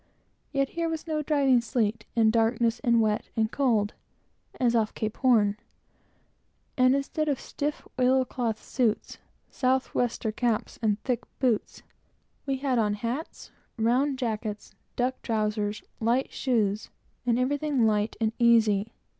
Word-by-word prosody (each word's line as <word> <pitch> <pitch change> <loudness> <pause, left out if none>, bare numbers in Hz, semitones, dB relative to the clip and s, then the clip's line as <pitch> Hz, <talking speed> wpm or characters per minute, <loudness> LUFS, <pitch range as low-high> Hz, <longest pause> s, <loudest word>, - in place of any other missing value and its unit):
Yet 275 -2 +1
here 335 -1 -2
was 320 -1 -4
no 310 -2 -1
driving 275 -4 +3
sleet, 225 -2 -1
and 220 -1 +4
darkness, 230 0 +2
and 235 -1 +3
wet, 215 -1 +1
and 220 -1 +1
cold, 225 -7 +1 0.7
as 240 -2 +2
off 220 -2 +1
Cape 215 -1 -3
Horn; 215 -6 +3 1.2
and 255 +1 +4
instead 300 +2 -1
of 280 - +1
a - - -16
stiff 295 +1 -4
oil 260 +1 +4
cloth 235 -3 -2
suit, 235 -5 -1 0.3
south 260 0 0
wester 235 -2 0
caps, 230 0 -1
and 210 -2 +1
thick 250 -3 0 0.2
boots, 245 -5 -1 0.6
we 270 -1 0
had 260 -2 0
on 210 -2 +1
hats, 240 +9 -5 0.3
round 255 +5 +2
jackets, 215 -4 -4 0.2
duck 255 +1 -1
trowsers, 215 -2 -1 0.2
light 235 +4 +1
shoes, 215 -5 0 0.4
and 235 -1 +3
everything 275 0 +1
light 210 0 +1
and 220 -1 +1
easy. 225 -3 +4
235 Hz, 140 wpm, -27 LUFS, 220-260 Hz, 1.2 s, and